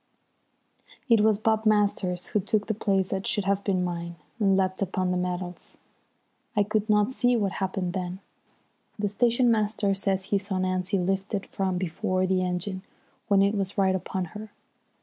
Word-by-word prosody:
It 230 -2 +6
was 215 -1 +4
Bob 220 0 +1
Masters 200 -4 +1
who 210 - +1
took 205 +2 0
the 220 - -1
place 195 -3 0
that 190 0 -2
should 205 -4 0
have 200 0 +1
been 185 -3 +1
mine, 170 -1 -4 0.2
and 195 -3 +3
leapt 190 0 0
upon 185 -1 0
the - - 0
metals. 180 0 -4 0.8
I 205 - +4
could 215 +1 -1
not 210 +2 +3
see 245 -1 +2
what 205 -4 +1
happened 185 -2 -2
then. 185 -1 -4 0.8
The 205 -1 -1
station 235 +3 +3
master 210 -2 +1
says 195 -1 0
he 200 +1 +1
saw 195 -1 -4
Nancy 185 +1 0
lifted 195 +2 -1
from 190 -2 -2
before 185 +1 -1
the 185 0 +1
engine 185 +1 -2 0.5
when 200 -2 +4
it 200 +1 +2
was 200 -1 -2
right 190 -1 +3
upon 190 0 -2
her. 215 0 -8
195 Hz, 170 wpm, -26 LUFS, 185-210 Hz, 0.8 s, It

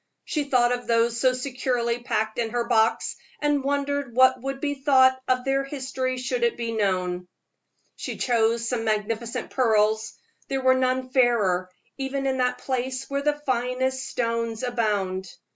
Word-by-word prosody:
She 300 -2 -1
thought 245 -3 +3
of 245 0 -2
those 230 0 +2
so 255 0 +4
securely 250 -2 -1
packed 220 -2 -1
in 230 -1 0
her 240 +1 -1
box, 225 -2 +2 0.2
and 295 -2 +1
wondered 285 -2 -1
what 260 0 +5
would 270 +1 -4
be 285 0 -1
thought 260 -2 +4
if 255 0 +1
their 270 0 +1
history 260 -2 -3
could 475 - 0
be 230 -1 -3
known. 185 -4 -1 0.7
She - - -5
chose 230 -1 +1
some 235 -1 -1
magnificent 220 +2 -2
pearls; 220 -3 +2 0.3
there 270 -1 -1
were 260 0 +6
none 255 0 0
fairer, 210 -8 +2 0.3
even 270 0 -2
in 265 -1 0
that 250 0 +1
place 260 0 -3
where 280 0 0
the 295 0 0
finest 260 +1 -1
stones 230 -1 -2
abound. 205 -6 -1
250 Hz, 155 wpm, -25 LUFS, 230-265 Hz, 0.7 s, were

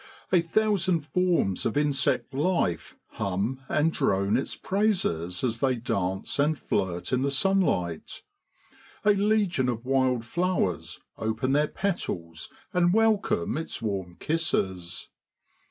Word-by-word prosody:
A 180 -2 +5
thousand 185 -1 +1
forms 170 - +1
of 115 - -1
insect 140 -2 +1
life 145 - 0
hum 100 +8 -2
and 160 +2 +2
drone 100 +2 +1
its 130 - -1
praises 175 - 0
as 115 -2 0
they 130 0 +2
dance 95 -2 -2
and 150 +2 +2
flirt 90 -4 -2
in 125 - +2
the 140 - +1
sunlight; 140 - 0 0.8
a 210 - +7
legion 200 -10 +2
of 120 0 -3
wild 130 -3 +1
flowers 175 - -1 0.2
open 110 +4 -1
their 150 +2 +3
petals 85 - -3 0.2
and 175 0 +3
welcome 215 -3 +2
its 160 - -5
warm 95 -5 -3
kisses. 95 - -2
135 Hz, 120 wpm, -27 LUFS, -, 0.8 s, a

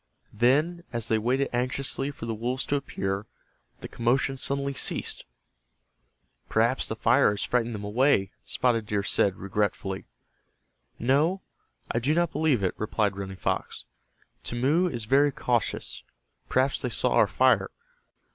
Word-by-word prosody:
Then, 150 +10 +2
as 120 -3 -2
they 110 - +3
waited 130 +5 +1
anxiously 130 +2 -1
for 140 -5 -7
the 115 - -2
wolves 125 +4 -2
to 145 - 0
appear, 100 -7 -3 0.5
the - - -6
commotion 130 +3 +1
suddenly 140 +1 -1
ceased. - - -2 1.2
"Perhaps 115 +4 +2
the 110 - -3
fire 120 +4 +4
has 100 0 -2
frightened 120 -2 0
them 105 - -6
away," 105 -2 +2
Spotted 115 -4 0
Deer 105 -1 0
said, 100 -1 +2
regretfully. 100 -1 -2 0.9
"No, 150 +10 +2 0.5
I 115 - +1
do 140 +6 +1
not 170 -1 +2
believe 145 -10 +1
it," 90 - +1
replied 105 -2 0
Running 95 -1 -6
Fox. - - -2 0.6
"Timmeu 145 +10 +1
is 115 -3 -4
very 140 +5 +4
cautious. 120 -4 -1 0.5
Perhaps 130 +2 +2
they - - -1
saw - - +1
our - - +5
fire. - - +3
120 Hz, 140 wpm, -27 LUFS, 105-140 Hz, 1.2 s, our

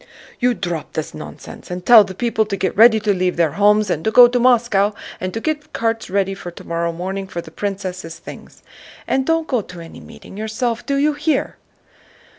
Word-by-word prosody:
"You 245 -1 +2
drop 175 -6 -5
this 155 - -4
nonsense 75 -1 -10
and 180 0 -6
tell 230 -3 +9
the 190 -1 -8
people 230 0 0
to 200 -2 -3
get 185 - -2
ready 220 +1 +6
to 210 -1 +1
leave 180 -1 -1
their 165 -3 +2
homes 210 +2 +3
and 160 - -2
go 245 +2 +9
to 245 +1 0
Moscow 235 -5 +3 0.3
and 185 0 -3
to 225 - -4
get 300 +3 -4
carts 225 -2 -2
ready 195 0 0
for 195 -2 -8
tomorrow 170 0 -3
morning 190 +3 -5
for 175 - -6
the 160 - -9
princess' 185 -4 -5
things. - - -12 0.4
And 265 0 0
don't 325 0 +1
go 250 -4 0
to 180 -3 -12
any 165 -1 -11
meeting 195 - -13
yourself, 220 +2 -2
do 280 - 0
you 295 +2 +2
hear?" 300 +2 -1
205 Hz, 200 wpm, -19 LUFS, 180-240 Hz, 0.4 s, tell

